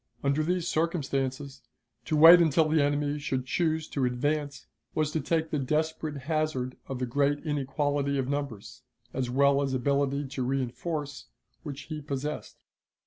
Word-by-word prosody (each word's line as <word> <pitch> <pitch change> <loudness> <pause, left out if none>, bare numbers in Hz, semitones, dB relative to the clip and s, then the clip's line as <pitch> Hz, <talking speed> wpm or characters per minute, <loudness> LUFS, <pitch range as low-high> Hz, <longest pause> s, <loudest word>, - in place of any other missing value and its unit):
Under 140 +2 +2
these 175 +2 0
circumstances, 140 -5 -2 0.4
to 155 - 0
wait 165 +3 +9
until 160 -1 +3
the 155 0 +3
enemy 145 +1 0
should 130 -3 -2
choose 160 +3 0
to 140 - -2
advance 145 +4 -1 0.3
was 155 -1 +1
to 160 - -1
take 160 +2 -1
the 150 - 0
desperate 155 +2 -1
hazard 155 -5 -1
of 135 - -4
the 125 - -1
great 145 +4 0
inequality 145 -1 0
of 130 -2 -1
numbers, 135 -5 -4 0.3
as 130 -2 -2
well 140 +2 +3
as 135 -2 -1
ability 140 +2 0
to 130 -1 -3
reënforce, 135 +4 -3 0.4
which 145 -3 -7
he 155 -2 -6
possessed. 145 +1 -5
145 Hz, 150 wpm, -28 LUFS, 135-155 Hz, 0.4 s, wait